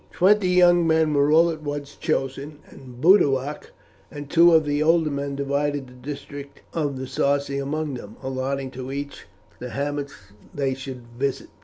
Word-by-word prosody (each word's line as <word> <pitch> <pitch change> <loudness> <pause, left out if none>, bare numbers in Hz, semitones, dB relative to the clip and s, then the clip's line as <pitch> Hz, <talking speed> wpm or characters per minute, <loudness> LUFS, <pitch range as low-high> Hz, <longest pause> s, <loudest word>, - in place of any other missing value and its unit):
Twenty 195 +1 +3
young 175 -2 +5
men 160 -1 +3
were 145 0 +3 0.2
at 155 - -10
once 145 -1 -5
chosen, 135 +3 -3
and 125 -2 -13
Boduoc 145 -5 +3 0.4
and 145 -1 -9
two 170 +1 +6
of 160 -2 +5
the 145 0 0
older 160 0 +3
men 140 0 -3
divided 140 0 -1
the 125 - -15
district 140 +2 -9
of 145 -4 -2
the 130 - -5
Sarci 140 +1 0
among 150 +1 -3
them, 110 -4 -8
allotting 130 0 -3
to 130 +1 -7
each 140 +1 -6 0.3
the 125 - -6
hamlets 140 +1 -3 0.4
they 135 -2 0
should 130 -2 -8
visit. 140 -1 -2
140 Hz, 160 wpm, -23 LUFS, 135-150 Hz, 0.4 s, two